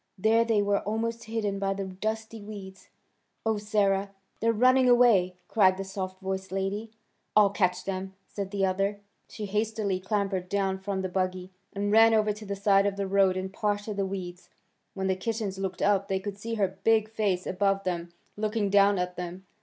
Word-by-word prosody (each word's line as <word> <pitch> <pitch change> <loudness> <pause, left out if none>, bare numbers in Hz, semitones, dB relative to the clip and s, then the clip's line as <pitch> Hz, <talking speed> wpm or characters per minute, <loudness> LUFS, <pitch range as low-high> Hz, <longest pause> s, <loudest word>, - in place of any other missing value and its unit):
There 220 +4 +4
they 225 -3 +2
were 200 0 +2
almost 230 +2 -3
hidden 215 -3 -2
by 195 0 0
the 195 0 -3
dusty 220 +4 -4
weeds. 200 -2 -10 0.6
"Oh, 220 -1 +1
Sarah! 200 -2 +1 0.3
They're 230 +1 +2
running 255 +3 +4
away!" 225 -7 +5
cried 190 -4 +4
the 195 - -3
soft 190 -1 -5
voiced 190 0 -4
lady. 195 +3 -2 0.5
"I'll 210 -2 +6
catch 180 -3 0
them!" 190 0 -4
said 200 -2 -5
the 195 -1 0
other. 195 +2 0 0.3
She 215 - -6
hastily 210 -1 -1
clambered 195 -2 -1
down 195 -1 0
from 190 0 -3
the - - 0
buggy, 185 0 -2 0.2
and 205 +1 -2
ran 225 +1 +6
over 215 -1 +2
to 210 +1 -10
the 200 - -2
side 200 0 +3
of 200 - -1
the 200 0 -2
road 190 -1 +3
and 190 +1 -4
parted 205 0 -1
the 200 - +1
weeds. 180 -2 -6 0.5
When 190 -1 -2
the 190 0 +2
kittens 205 -1 -3
looked 190 -2 -3
up 200 -1 +2
they 190 -1 0
could 200 +1 -6
see 230 +2 -4
her 195 -3 -1
big 220 -1 +4
face 210 -5 -1
above 195 +1 +1
them 175 -2 -3 0.2
looking 215 -1 -1
down 200 0 +5
at 180 0 -2
them. 180 +1 -6
200 Hz, 190 wpm, -28 LUFS, 190-215 Hz, 0.6 s, I'll